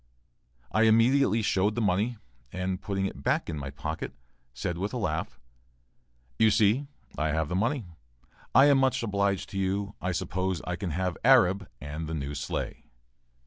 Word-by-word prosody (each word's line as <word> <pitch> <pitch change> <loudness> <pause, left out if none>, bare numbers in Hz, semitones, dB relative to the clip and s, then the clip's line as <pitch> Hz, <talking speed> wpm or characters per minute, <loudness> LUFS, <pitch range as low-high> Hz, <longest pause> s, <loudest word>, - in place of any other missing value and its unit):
I 110 - +3
immediately 115 +1 +4
showed 100 +2 +1
the - - -1
money, 105 +3 +1 0.3
and, 90 +1 -3
putting 95 -1 -2
it 85 - -5
back 75 - 0
in 75 - -4
my 70 -1 -5
pocket, 70 -1 -5 0.4
said 85 +7 -4
with 100 +5 -2
a - - -2
laugh: 80 -7 -3 1.0
"you 110 - +6
see 110 +6 +3 0.3
I 75 - +1
have 80 0 0
the 90 - -2
money. 115 +5 0 0.7
I 135 +3 +8
am 140 -2 +5
much 130 -2 +2
obliged 100 -3 0
to 95 - -3
you; 100 +2 -1
I 90 - -1
suppose 90 +1 -2
I 90 - -2
can 95 -1 -4
have 90 +3 -2
'Arab' 105 -6 +5
and 75 +2 -5
the 80 - -3
new 70 -1 -4
sleigh?" 70 0 -4
95 Hz, 170 wpm, -28 LUFS, 80-110 Hz, 1.0 s, I